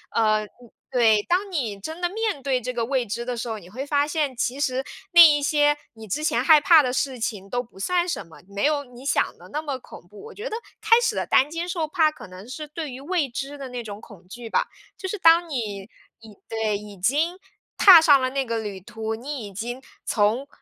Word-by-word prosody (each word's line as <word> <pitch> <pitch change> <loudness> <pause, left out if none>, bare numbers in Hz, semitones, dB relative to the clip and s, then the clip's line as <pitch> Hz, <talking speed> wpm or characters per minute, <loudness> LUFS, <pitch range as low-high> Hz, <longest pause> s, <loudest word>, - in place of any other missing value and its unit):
呃， 215 -1 +2 0.4
对， 225 -4 +4
当 380 +3 +1
你 235 - -3
真 320 - -7
的 350 - +1
面 425 -6 -2
对 265 -2 0
这 250 +1 -5
个 240 -1 -1
未 260 0 0
知 235 +3 -4
的 245 0 -4
时 235 - -4
候， 220 -2 -4
你 175 -2 -15
会 255 +8 -6
发 290 0 +1
现 295 -4 -1
其 250 +3 -2
实 260 -2 0 0.3
那 345 -1 +9
一 300 -3 +8
些 295 0 +3 0.2
你 220 -1 -12
之 295 +11 -3
前 245 -5 +1
害 305 +2 +7
怕 320 +1 +6
的 255 -3 -1
事 260 0 -2
情 205 -4 -4
都 245 +3 -1
不 235 -5 -18
算 355 - 0
什 335 - -3
么， 165 - -16
没 200 +3 -2
有 295 -1 +1
你 250 +1 -14
想 280 - 0
的 - - -15
那 300 - -3
么 285 -4 -4
恐 235 - -14
怖， 205 +2 -14
我 - - -10
觉 450 +4 -6
得 440 - -4 0.3
开 455 +2 +5
始 465 -2 0
的 - - -2
担 270 +2 +4
惊 335 +2 -4
受 335 -3 -2
怕， 315 -1 +3
可 305 - -12
能 185 +3 -12
是 300 +4 -7
对 305 0 -6
于 250 - -8
未 315 -1 -1
知 275 +4 -5
的 270 -2 -7
那 245 -1 -5
种 210 -1 -8
恐 180 -3 -15
惧 235 +4 -9
吧。 - - +1 0.3
就 380 - -5
是 420 - -3
当 335 0 +5
你 210 -9 -4 0.3
已 220 -2 -14
对， 220 -2 -1
已 205 -1 -11
经 295 - 0 0.4
踏 365 -5 +9
上 295 -4 +6
了 255 0 0
那 275 0 0
个 230 -2 -3
旅 205 -3 -6
途， 220 +2 -5
你 255 +1 -6
已 200 - -12
经 240 +6 -5 0.3
从， 220 +6 +1
260 Hz, 255 characters per minute, -24 LUFS, 220-310 Hz, 0.4 s, 那